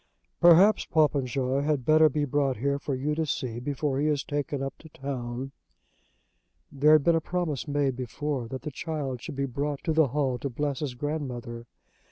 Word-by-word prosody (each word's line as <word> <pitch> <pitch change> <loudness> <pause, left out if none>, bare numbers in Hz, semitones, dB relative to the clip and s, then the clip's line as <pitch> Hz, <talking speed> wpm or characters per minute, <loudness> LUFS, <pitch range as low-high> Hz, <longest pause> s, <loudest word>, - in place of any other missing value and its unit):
"Perhaps 175 +5 +6
Popenjoy 135 -3 +1
had 145 -3 0
better 155 +1 +6
be 150 +1 -1
brought 140 -1 0
here 140 +4 0
for 140 -1 -3
you 140 +4 -1
to 160 +1 0
see 130 -5 -3
before 140 +1 -2
he 150 - +1
is 145 -2 +1
taken 145 -1 -3
up 135 - -4
to 160 - -14
town." 130 -2 -5 1.2
There 150 +2 +4
had 155 -2 +5
been 170 - +4
a 165 - +2
promise 165 -5 -2
made 140 -2 0
before 130 0 -3
that 130 +2 -6
the 150 - -4
child 140 -4 -4
should - - -7
be 140 0 -1
brought 140 +2 -3
to 160 - 0
the 155 -2 +4
hall 130 -2 -1
to 140 - -3
bless 140 +2 -2
his 140 -5 -4
grandmother. 125 -5 -4
140 Hz, 190 wpm, -27 LUFS, 130-150 Hz, 1.2 s, Perhaps